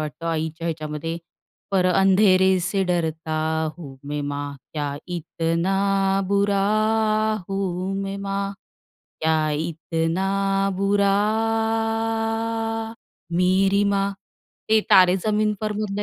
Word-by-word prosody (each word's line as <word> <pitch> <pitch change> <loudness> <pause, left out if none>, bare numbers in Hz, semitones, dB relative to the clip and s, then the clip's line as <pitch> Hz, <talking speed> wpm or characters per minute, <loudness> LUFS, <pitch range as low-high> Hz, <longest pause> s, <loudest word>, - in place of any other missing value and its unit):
वाटतं, 155 +2 -5
आईच्या 160 0 -2
ह्याच्यामध्ये, 155 0 -4 0.5
पर 185 -2 +2
अंधेरे 190 0 +4
से 195 +2 0
डरता 160 -3 -1 0.4
हूँ 140 -5 -9
मैं 150 0 -2
माँ, 145 0 -4 0.2
क्या 145 -2 -3
इतना 195 +4 0
बुरा 200 0 +2 0.9
हूँ 190 -1 -2
मैं 195 0 -4
माँ, 195 0 -2 0.7
क्या 155 -1 +1
इतना 165 +3 -2 0.5
बुरा 200 0 +2 2.2
मेरी 190 +3 +3
माँ. 200 0 +1 0.6
ते 220 0 +5
"तारे 185 0 +7
जमीन 215 0 +2
पर" 215 -1 -1
मधलं 205 -1 -3
185 Hz, 95 wpm, -23 LUFS, 160-195 Hz, 2.2 s, तारे